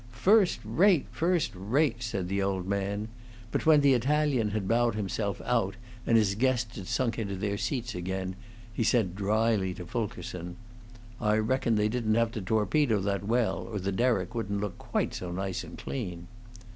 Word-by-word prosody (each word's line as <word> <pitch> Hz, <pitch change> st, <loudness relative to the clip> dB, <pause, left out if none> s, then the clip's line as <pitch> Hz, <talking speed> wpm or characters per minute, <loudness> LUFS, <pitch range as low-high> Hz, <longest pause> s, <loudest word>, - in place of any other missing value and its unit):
"First 195 Hz, -, +4 dB
rate, 185 Hz, -4 st, +4 dB
first 175 Hz, 0 st, +1 dB
rate!" 115 Hz, +6 st, 0 dB
said 100 Hz, -6 st, -2 dB
the 100 Hz, +2 st, -1 dB
old 95 Hz, -2 st, -1 dB
man; 100 Hz, +2 st, -1 dB, 0.4 s
but -, -, -1 dB
when 155 Hz, -2 st, +7 dB
the 140 Hz, -1 st, +5 dB
Italian 135 Hz, -2 st, +2 dB
had 105 Hz, -2 st, -2 dB
bowed 115 Hz, 0 st, +2 dB
himself 100 Hz, -1 st, -2 dB
out 115 Hz, -6 st, +1 dB, 0.3 s
and 115 Hz, -, +5 dB
his 105 Hz, -3 st, +3 dB
guests 120 Hz, 0 st, 0 dB
had 95 Hz, -3 st, -7 dB
sunk 120 Hz, -3 st, 0 dB
into 100 Hz, -3 st, -3 dB
their 100 Hz, +1 st, -2 dB
seats 120 Hz, +2 st, -2 dB
again, 95 Hz, +1 st, -3 dB, 0.4 s
he 115 Hz, -, 0 dB
said 105 Hz, -6 st, +2 dB
dryly 105 Hz, -2 st, +1 dB
to -, -, -7 dB
Fulkerson, 90 Hz, -7 st, -4 dB, 0.7 s
"I 105 Hz, -1 st, +3 dB
reckon 115 Hz, +1 st, +1 dB
they 105 Hz, 0 st, +2 dB
didn't 110 Hz, -1 st, 0 dB
have 115 Hz, 0 st, +2 dB
to 115 Hz, -3 st, -4 dB
torpedo 110 Hz, +4 st, +2 dB
that 100 Hz, 0 st, -1 dB
well, 120 Hz, 0 st, +1 dB
or 115 Hz, -2 st, -5 dB
the 100 Hz, 0 st, -2 dB
derrick 105 Hz, -2 st, +1 dB
wouldn't 100 Hz, -4 st, -2 dB
look 105 Hz, -2 st, -4 dB
quite -, -, -1 dB
so 90 Hz, -1 st, -5 dB
nice 95 Hz, +1 st, -3 dB
and -, -, -10 dB
clean." 90 Hz, -10 st, -5 dB
110 Hz, 175 wpm, -29 LUFS, 100-120 Hz, 0.7 s, when